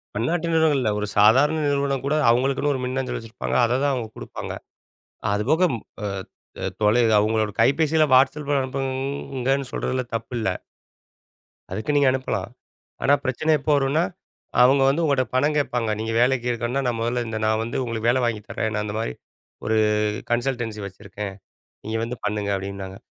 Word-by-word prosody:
பன்னாட்டு 160 +10 0
நிறுவனங்கள் 160 -3 +3
இல்ல. 110 - +1
ஒரு 105 - -2
சாதாரண 130 +10 +5
நிறுவனம் 140 -2 0
கூட 140 +2 +1
அவுங்களுக்குன்னு 135 +4 +2
ஒரு 130 - -3
மின்னஞ்சல் 130 +1 -2
வச்சிருப்பாங்க. 115 +1 -5
அததான் 130 +4 +1
அவுங்க 120 -4 -3
குடுப்பாங்க - - -6 0.8
அதுபோக 135 - +2
அ. - - 0
ம் 115 - -7 0.8
அ - - -2 0.2
தொலை 105 +4 +4 0.2
அவங்களோட 110 0 +1
கைபேசியில 155 +6 +4
Whatsappல 140 +2 +3
அனுப்புங்கன்னு 135 0 -2
சொல்றதுல 130 0 -1
தப்பில்ல. 115 0 -3 1.2
அதுக்கு 110 +9 -2
நீங்க 145 -1 +4
அனுப்பலாம். 130 0 -2 0.5
ஆனா 140 - +4
பிரச்சனை 130 +5 0
எப்போ 150 - -1
வரும்னா, 140 +4 +2 0.6
அவுங்க 135 +2 +5
வந்து 155 +5 +1
உங்கட்ட 140 -4 +2
பணம் 145 +4 +2
கேட்பாங்க. 120 -6 0
நீங்க 110 +1 -2
வேலைக்கு 125 -1 +2
இருக்கணும்ன்னா 120 +3 -2
நான் 115 -2 -1
மொதல்ல 120 +1 -1
இந்த 110 -1 -3
நான் 110 0 +1
வந்து 115 +4 -3
உங்களுக்கு 115 -1 -1
வேலை 130 +2 +2
வாங்கித் 110 -3 -3
தர்றேன், 110 0 -2
நான் 105 0 -1
இந்த 105 - -4
மாதிரி 110 - -2 0.5
ஒரு 110 +1 +1 0.5
கன்சல்டன்சி 120 -3 -1
வச்சுருக்கேன், 100 +1 -7 0.5
நீங்க 110 +1 -2
வந்து 120 +1 -5
பண்ணுங்க 105 -1 -1
அப்டின்னாங்க. 95 0 -6
125 Hz, 155 wpm, -23 LUFS, 110-140 Hz, 1.2 s, சாதாரண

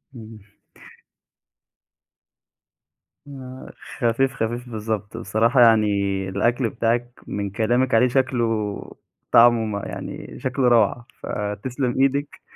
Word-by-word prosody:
إمم. 110 -3 -12 2.8
آه 130 -2 -10 0.3
خفيف 125 +2 +1
خفيف 120 +2 -4
بالضبط، 110 -1 -4
بصراحة 115 +3 +2
يعني 110 -2 +6 0.4
الأكل 120 +5 0
بتاعِك 120 +2 -2
من 100 -1 -3
كلامِك 120 +5 0
عليه 125 +3 +5
شكله 115 -5 -1 0.5
طعمه 115 -1 +6
م 105 - -3
يعني - - -8
شكله 130 0 0
روعة، 120 0 +3 0.2
فتسلَم 120 +5 -3
إيدِك 140 +1 0
115 Hz, 95 wpm, -22 LUFS, 110-125 Hz, 2.8 s, يعني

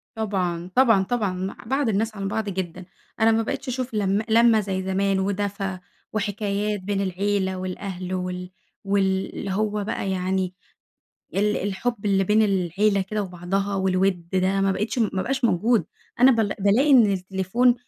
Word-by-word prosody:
طبعًا، 185 -5 -2
طبعًا، 225 -7 +5
طبعًا. 205 -2 -1
م 185 +1 -4
بَعَد 270 -2 +1
الناس 220 +2 0
عن 195 -1 -3
بعض 210 +1 -2
جدًا، 185 -1 -5 0.3
أنا 225 0 +5
ما 225 0 +2
بقيتش 220 - -4
أشوف 255 -1 -3
لم 200 -1 +1
لمة 230 0 +5
زي 190 -2 -2
زمان 195 +1 +1
ودَفَا 195 -1 -2 0.3
وحكايات 205 0 -1
بين 195 +1 -2
العيلة 190 0 -1
والأهل 185 0 -5
وال 180 0 -4 0.3
واللي 195 -1 0
هو 210 +1 -1
بقى 200 -2 -3
يعني 185 0 -1 0.8
ال 210 +1 +2
الحب 205 +3 -2
اللي 195 -1 +3
بين 210 +3 +3
العيلة 200 +1 +1
كده 210 +2 -3
وبعضها 195 +2 -2
والوِد 185 -2 +1
ده 190 +1 +2
ما 195 0 +2
بقيتش 210 +6 -2
ما 200 -5 0
بقاش 265 0 -2
موجود. 230 +2 +2 0.3
أنا 255 +2 +8
ب - - 0 0.2
بالاقي 210 +9 +3
إن 250 -5 +7
التليفون 190 +6 +1
195 Hz, 155 wpm, -24 LUFS, 190-215 Hz, 0.8 s, أنا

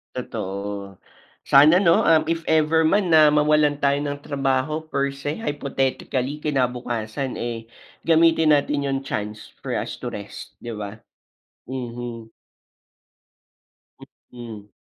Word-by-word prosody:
Totoo. 100 -4 -5 0.5
Sana 155 +7 +6
'no, 170 -3 +5
ah, 160 -1 +5
if 165 0 -2
ever 160 0 +3
man 190 +1 +2
na 155 -1 +7
mawalan 150 0 +3
tayo 140 0 +3
ng 145 -1 -4
trabaho 140 +3 -1
per 140 -3 -1
se 140 +2 -4
hypothetically, 135 - -2
kinabukasan, 125 -3 -2
eh, 115 -1 -4 0.4
gamitin 160 -1 +5
natin 145 0 0
yung 135 -1 -1
chance 110 -4 -5
for - - -4
us - - -4
to - - -5
rest, - - -9
'di 120 - -6
ba? 105 0 -7 0.6
Mhm. 120 -3 -6 2.0
Mm. 115 -4 -9
140 Hz, 115 wpm, -23 LUFS, 120-150 Hz, 2.0 s, na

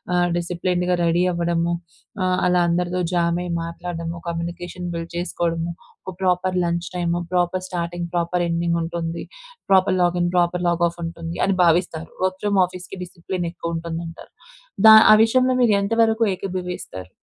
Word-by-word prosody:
ఆహ్, 175 0 +3
డిసిప్లిన్డ్‌గా 180 +1 -1
రెడీ 170 +1 +2
అవ్వడము. 170 0 0 0.5
ఆహ్, 185 0 +1
అలా 180 0 +3
అందరితో 180 +1 0
జామయి 175 0 0
మాట్లాడడము. 170 0 -5
Communication 175 +1 -5
build 165 0 -5
చేసుకోడము. 170 -1 -2 0.3
ఒక 190 - -5
proper 185 0 +1
lunch 170 0 -2
time, 175 -1 0
proper 180 +1 0
starting, 175 -1 -3
proper 175 +1 0
ఎండింగుంటుంది. 170 0 -2 0.5
Proper 190 0 +4
login, 175 0 +2
proper 175 0 +1
log off 170 0 0
ఉంటుంది 165 0 -6
అని 195 - +1
భావిస్తారు. 165 -1 +1
వర్క్ 185 0 -2
ఫ్రమ్ 205 -2 +2
ఆఫీసుకి 180 +1 -9
డిసిప్లినెక్కువ 170 -1 -5
ఉంటుందంటారు. 165 0 -7 0.6
దా 220 - +11 0.2
ఆ - - +8
విషయంలో 255 +2 +2
మీరు 225 -3 +4
ఎంతవరకు 225 +2 +2
ఏకీభవిస్తారు? 180 - -6
175 Hz, 130 wpm, -22 LUFS, 170-180 Hz, 0.6 s, దా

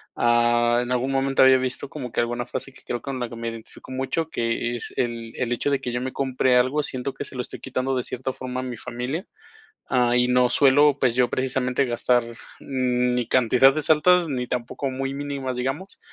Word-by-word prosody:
Ah, 120 0 +3
en 125 +1 -4
algún 125 +2 0
momento 135 0 +2
había 130 0 +7
visto 130 +1 -3
como 130 -6 -7
que - - -2
alguna 120 +1 -2
frase 135 - -5
que, - - -17
creo 120 - -3
que - - -29
con 135 -2 -4
la 120 - -3
que 115 - -9
me 115 0 -4
identifico 115 +2 -11
mucho, 135 +5 -2
que: 120 +1 -1
"Es 120 - -2
el 115 -2 -2
el 125 -1 -2
hecho 145 - -1
de 140 - +1
que 125 - -4
yo 120 0 -2
me 130 +1 -3
compre 130 -1 +1
algo, 130 +5 +2
siento 130 -1 -3
que - - -6
se 140 - -9
lo 125 - -2
estoy - - -8
quitando 130 0 -2
de 125 - -1
cierta 130 +1 -4
forma 130 0 -5
a - - -6
mi 125 -3 -5
familia". 130 - -5 0.6
Ah, 125 -2 +2
y 125 0 +3
no 125 0 +3
suelo, 145 +2 +5
pues, 125 -3 +2
yo 125 0 +2
precisamente 130 +1 0
gastar, 120 0 +2 0.4
mm, 125 -2 0
ni 125 -1 -1
cantidades 130 +5 +4
altas, 170 +3 +4
ni 125 -3 -2
tampoco 125 +3 -3
muy 135 +1 -3
mínimas, 140 -3 -4
digamos, 140 +10 -4
125 Hz, 220 wpm, -24 LUFS, 120-135 Hz, 0.6 s, había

